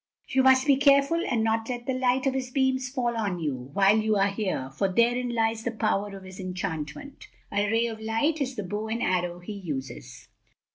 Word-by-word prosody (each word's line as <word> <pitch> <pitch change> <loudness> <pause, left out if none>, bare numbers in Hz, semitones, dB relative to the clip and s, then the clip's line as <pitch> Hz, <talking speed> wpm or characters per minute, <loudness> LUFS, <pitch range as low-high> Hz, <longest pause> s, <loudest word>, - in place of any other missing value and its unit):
You 265 - +3
must 260 0 +5
be 280 -2 +4
careful 280 +4 +4
and 230 -3 +1
not 225 +1 0
let 240 -1 -4
the 265 - -1
light 255 +1 +1
of 270 - +2
his 260 -1 -3
beams 260 -1 0
fall 245 -3 -1
on 205 -5 -1
you, 135 -5 -4
while 200 +3 +5
you 215 0 +1
are 200 0 +3
here, 190 -10 -3
for 190 +7 -1
therein 240 +4 +2
lies 225 0 0
the 235 - -1
power 205 -3 -1
of 190 - -12
his 185 0 -11
enchantment. 185 - -5 0.2
A 205 0 +1
ray 225 +2 +2
of 225 -2 -4
light 255 +9 0
is 265 -1 -2
the 210 - -4
bow 205 +4 -4
and 230 +2 -2
arrow 180 -1 0
he 175 +4 -8
uses." 140 - -7
225 Hz, 210 wpm, -27 LUFS, 195-255 Hz, 0.2 s, must